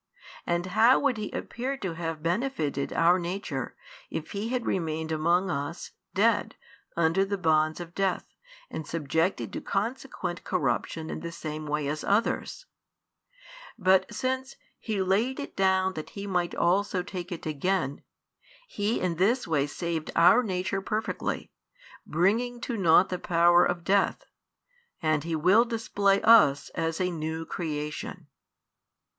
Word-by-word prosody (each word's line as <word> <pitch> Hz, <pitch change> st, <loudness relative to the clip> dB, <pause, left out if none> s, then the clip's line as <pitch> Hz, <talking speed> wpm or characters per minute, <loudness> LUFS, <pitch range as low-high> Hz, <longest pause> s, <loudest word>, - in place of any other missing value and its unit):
And 175 Hz, +1 st, 0 dB
how 230 Hz, +4 st, +6 dB
would 275 Hz, -5 st, +1 dB
He 210 Hz, -1 st, -4 dB
appear 265 Hz, +3 st, -4 dB
to 190 Hz, -8 st, -4 dB
have 165 Hz, -2 st, -4 dB
benefitted 170 Hz, -, -1 dB
our 175 Hz, +2 st, +4 dB
nature, 170 Hz, -, -4 dB, 0.3 s
if 160 Hz, -, -5 dB
He 205 Hz, +3 st, -3 dB
had 250 Hz, -1 st, -1 dB
remained 160 Hz, -2 st, -2 dB
amongst 170 Hz, +4 st, +2 dB
us, 140 Hz, -1 st, -4 dB, 0.2 s
dead, -, -, +2 dB, 0.4 s
under 170 Hz, +3 st, +3 dB
the 200 Hz, +1 st, -2 dB
bonds 155 Hz, -2 st, +2 dB
of 170 Hz, -1 st, -8 dB
death, 195 Hz, -1 st, 0 dB, 0.5 s
and 155 Hz, -, -5 dB
subjected 165 Hz, +3 st, -1 dB
to -, -, -4 dB
consequent 205 Hz, -4 st, -3 dB
corruption 140 Hz, +5 st, -1 dB
in -, -, -4 dB
the 170 Hz, -, -6 dB
same 155 Hz, -2 st, -6 dB
way 150 Hz, -1 st, -1 dB
as 150 Hz, +1 st, -3 dB
others? 220 Hz, -, 0 dB, 1.1 s
But 190 Hz, -2 st, +3 dB
since 260 Hz, +1 st, -2 dB, 0.2 s
He 210 Hz, -4 st, -1 dB
laid 220 Hz, +9 st, +1 dB
it 285 Hz, -, -6 dB
down 190 Hz, -1 st, +2 dB
that 155 Hz, -3 st, -6 dB
He 200 Hz, -, -4 dB
might 180 Hz, -3 st, -1 dB
also 185 Hz, +1 st, +1 dB
take 180 Hz, -1 st, -6 dB
it 170 Hz, -, -6 dB
again, 155 Hz, -1 st, -1 dB, 0.7 s
He 210 Hz, -, -1 dB
in 175 Hz, -3 st, -1 dB
this 220 Hz, +7 st, +2 dB
way 145 Hz, -3 st, +1 dB
saved 165 Hz, +1 st, -3 dB
our 180 Hz, +9 st, +6 dB
nature 190 Hz, -2 st, -2 dB
perfectly, 215 Hz, +2 st, -3 dB, 0.6 s
bringing 225 Hz, +9 st, +1 dB
to 240 Hz, -, -3 dB
naught 180 Hz, -2 st, +5 dB
the 180 Hz, -, -3 dB
power 175 Hz, 0 st, +4 dB
of 175 Hz, -1 st, -1 dB
death; 200 Hz, -, +1 dB, 0.7 s
and 155 Hz, -2 st, +1 dB
He 165 Hz, 0 st, -2 dB
will 185 Hz, +9 st, +5 dB
display 205 Hz, -4 st, +1 dB
us 150 Hz, -12 st, +6 dB
as 165 Hz, 0 st, -2 dB
a 180 Hz, -1 st, 0 dB
new 160 Hz, 0 st, -4 dB
creation. 155 Hz, +1 st, -5 dB
180 Hz, 145 wpm, -27 LUFS, 160-205 Hz, 1.1 s, how